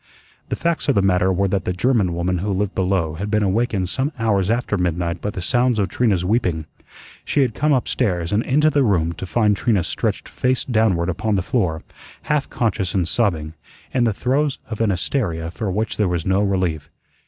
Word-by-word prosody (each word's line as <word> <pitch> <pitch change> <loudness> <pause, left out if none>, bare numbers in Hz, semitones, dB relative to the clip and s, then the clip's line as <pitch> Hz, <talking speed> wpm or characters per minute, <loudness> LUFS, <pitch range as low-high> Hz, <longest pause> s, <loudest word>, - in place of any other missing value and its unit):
The - - -1
facts 170 -3 -1
of 140 - +3
the 100 - +3
matter 95 -1 +3
were 95 +2 +1
that 95 0 0
the 90 - 0
German 100 -3 +1
woman 90 +1 -1
who 100 +3 -2
lived 100 +1 -1
below 90 -4 0
had 100 +6 -4
been 105 0 +2
awakened 100 -1 0
some 135 - -1
hours 105 -4 +1
after 115 -2 0
midnight 85 -2 -1
by 105 - -2
the 95 -3 -5
sounds 120 +4 +2
of 100 -2 +1
Trina's 100 -8 +1
weeping. 90 -7 0 0.6
She 145 - +1
had 125 -4 -1
come 150 +5 +1
upstairs 100 - 0
and 105 - +2
into 150 +5 +2
the 145 - +2
room 85 -9 +2
to 95 - -7
find 105 0 +2
Trina 100 -2 +1
stretched - - -2
face 125 0 0
downward 110 -8 +2
upon 105 +4 -1
the 95 - 0
floor, 90 -9 -1 0.4
half 150 -2 0
conscious 100 -6 -1
and 90 -4 +1
sobbing, 85 -7 0 0.4
in 125 -2 +2
the 115 - +2
throes 135 +6 0
of 110 - -3
an 110 - +2
hysteria 85 -4 -1
for 105 +2 -4
which 105 +4 -2
there 105 - +2
was 85 -2 -2
no 95 +1 +2
relief. 90 -7 -1
100 Hz, 205 wpm, -21 LUFS, 90-120 Hz, 0.6 s, of